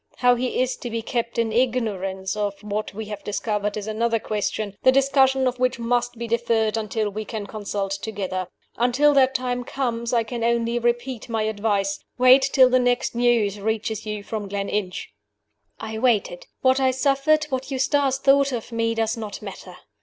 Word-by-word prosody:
How 245 0 +4
he 245 +1 -1
is 255 0 +1
to 240 - -6
be 230 0 -3
kept 235 0 -3
in 230 -1 +1
ignorance 205 -6 -1
of 205 -1 -2
what 210 +1 -3
we 220 +2 -6
have 210 -1 -7
discovered 210 0 -2
is 210 - -4
another 230 +2 0
question, 210 -1 -3
the 260 - +6
discussion 270 -1 +3
of 250 0 -2
which 255 0 +1
must 240 +1 -1
be 235 0 -4
deferred 225 -1 +1
until 215 -1 -2
we 215 +2 -4
can 215 -1 -5
consult 200 -1 -4
together. 190 -4 -3 0.3
Until 255 +5 +3
that 265 -1 +4
time 245 -1 -1
comes, 235 -3 -2
I 235 -2 +2
can 230 +1 -5
only 235 0 +1
repeat 240 0 -2
my 225 -1 0
advice 205 -2 0 0.2
wait 255 +2 +7
till 260 -2 +6
the 255 - +5
next 245 0 +1
news 235 -4 +2
reaches 220 +1 -2
you 210 -2 -5
from 210 -2 -5
Gleninch." 200 -1 -3 0.7
I 220 0 -5
waited. 220 -7 +1
What 260 0 +4
I 265 -1 +3
suffered, 275 +4 +2
what 260 0 -3
Eustace 270 0 +1
thought 275 0 +4
of 240 -1 -5
me, 230 0 0
does 225 0 0
not 215 -3 -6
matter. 185 -2 -9
230 Hz, 180 wpm, -23 LUFS, 210-255 Hz, 0.7 s, wait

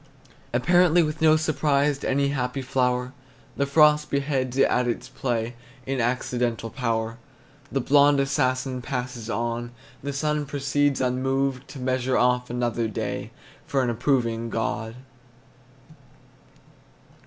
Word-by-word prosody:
Apparently 175 +7 +4
with 155 0 -3
no 155 -1 +6
surprise 150 -2 +1
To - - -3
any 140 +1 +2
happy 130 -1 -2
flower, 125 -1 0 0.4
The 140 - 0
frost 150 +1 +4
beheads 135 -2 -1
it 135 - +5
at 125 0 +1
its 120 - -3
play 120 -2 -2 0.3
In 135 -1 -1
accidental 120 -1 -1
power. 115 -2 -2 0.5
The 135 - 0
blond 145 +2 +5
assassin 130 -2 0
passes 125 -3 -4
on, 120 +1 -2 0.3
The 140 - -3
sun 150 +1 -1
proceeds 145 0 0
unmoved 135 +1 0
To 135 0 -9
measure 130 0 0
off 125 0 +2
another 120 -1 -1
day 110 - -4 0.4
For 135 -2 +1
an 120 - 0
approving 115 -2 0
God. 115 0 -3
130 Hz, 125 wpm, -25 LUFS, 120-140 Hz, 0.5 s, no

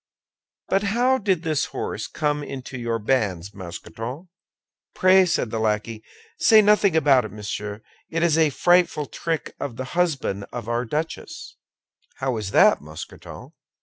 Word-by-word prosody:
But 195 - +2
how 245 +6 +2
did 190 -5 0
this 155 -4 0
horse 105 -1 -4
come 150 -2 -1
into 130 -2 -7
your 120 -2 -2
hands, 100 -8 0
Mousqueton?" 115 - -8 0.7
"Pray," 185 0 +5
said 125 -9 0
the 115 - -2
lackey, 110 0 -1 0.4
"say 220 - +7
nothing 205 -4 +4
about 140 -5 +5
it, 110 - -7
monsieur; 105 0 -6 0.3
it 165 +1 -1
is 170 -3 +3
a 160 -1 +4
frightful 175 +1 +2
trick 165 +2 -4
of 135 -5 -4
the 130 - -4
husband 140 - 0
of 120 -3 -6
our 120 +1 -1
duchess!" 160 - -5 0.6
"How 130 -2 -2
is 105 -3 -4
that, - - +5
Mousqueton?" 75 +1 -10
135 Hz, 150 wpm, -23 LUFS, 110-170 Hz, 0.7 s, say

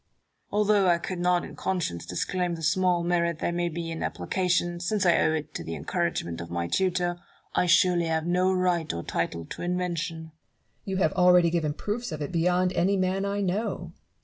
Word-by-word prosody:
Although 210 -2 +3
I 175 -1 +4
could 180 +1 -5
not 180 0 +2
in - - -10
conscience 85 - -2
disclaim 175 - -1
the 165 - -8
small 175 +1 +2
merit 170 -1 +1
there 175 - -1
may 175 0 -1
be 165 0 -4
in 165 - -5
application, 175 -2 0
since 195 +3 0
I 175 - +5
owe 160 - +3
it 155 -1 -4
to - - -5
the 80 - -5
encouragement 85 +2 -2
of 85 - -8
my 85 0 -2
tutor, 180 - 0 0.3
I 180 - +2
surely 175 0 +4
have 160 -1 0
no 180 +2 +2
right 180 -3 +1
or 85 0 -5
title 85 -1 -2
to - - -8
invention. 175 -2 -2
Barrow. 160 0 -11 0.5
You 190 -1 -2
have 185 -5 +2
already 180 -2 +5
given 155 -4 0
proofs 220 +3 -3
of 155 - -4
it 145 - -4
beyond 180 +2 +2
any 190 +4 +2
man 190 +1 0
I 200 0 -1
know. 185 -3 -2
175 Hz, 200 wpm, -27 LUFS, 160-185 Hz, 0.5 s, I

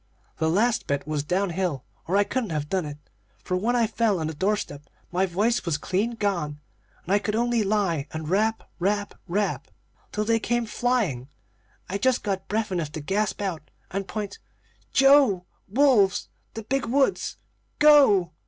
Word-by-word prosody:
The 160 - +1
last 225 +7 +1
bit 140 -1 -1
was 155 -1 -1
down 180 +5 0
hill, 175 -6 -2 0.2
or 185 +4 +2
I 205 - +5
couldn't 240 0 -2
have 150 -2 -2
done 185 -5 -1
it; 145 0 -7 0.5
for 180 - -1
when 225 +7 +1
I 235 -2 +3
fell 220 -3 +1
on 160 - -2
the 160 - -3
doorstep 155 -5 -2 0.2
my 185 +2 +1
voice 210 +7 +1
was 170 -4 0
clean 210 +6 -1
gone, 170 -9 -2 0.4
and 185 - -1
I 205 - +5
could 210 +1 -2
only 240 0 +1
lie 195 -8 0
and 160 -1 -6
rap, 215 +5 +1 0.2
rap, 205 +3 0
rap! 200 +3 -1 0.4
till 210 0 -1
they 225 +1 +2
came 240 +1 0
flying. 215 - -1 0.6
I 200 +2 -3
just 255 +3 +2
got 190 -2 -2
breath 215 -1 -1
enough 165 -5 -2
to 155 - -4
gasp 205 +6 -1
out 170 -6 -4 0.2
and 195 0 -3
point: 205 -2 -5 0.5
"'Joe 270 -10 +5 0.2
wolves 210 -4 +3 0.3
the 225 - -5
big 270 +4 -1
woods 270 +8 +1 0.4
go!' 275 - +6
200 Hz, 170 wpm, -25 LUFS, 175-225 Hz, 0.6 s, go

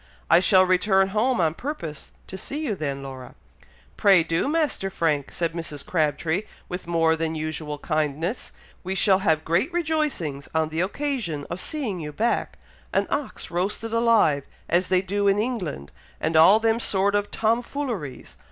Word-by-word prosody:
I 170 - +8
shall 185 +1 +5
return 190 +1 +3
home 230 +5 +1
on 160 -3 +2
purpose 165 - -6
to - - -8
see 290 - -4
you 230 - 0
then, 140 -6 -4
Laura." 130 -2 -9 0.6
"Pray 195 -4 +5
do, 165 +8 0
Master 300 -10 0
Frank," 155 -6 -1
said 165 -2 -2
Mrs. 155 -4 -5
Crabtree, 160 +2 0 0.3
with 180 -1 -6
more 165 -1 +3
than 160 0 -2
usual 155 -1 -4
kindness; 155 - -2 0.3
"we 190 +1 -3
shall 195 0 +4
have 160 -5 +1
great 175 - +1
rejoicings 300 - -1
on 160 -1 +2
the 160 +2 -1
occasion 200 - -2
of 170 - -3
seeing 240 - -3
you 150 -2 -5
back 225 +11 -1 0.3
an - - +2
ox 290 - -3
roasted 200 +6 -2
alive, 225 - +3 0.2
as 175 +2 +2
they 185 0 +2
do 200 +2 0
in 200 0 +4
England, 205 - -3 0.3
and 160 +1 -1
all 175 +7 +7
them 225 0 +2
sort 200 -2 +2
of 205 0 0
Tom 225 +2 +1
fooleries. 230 - -5
185 Hz, 165 wpm, -24 LUFS, 160-220 Hz, 0.6 s, I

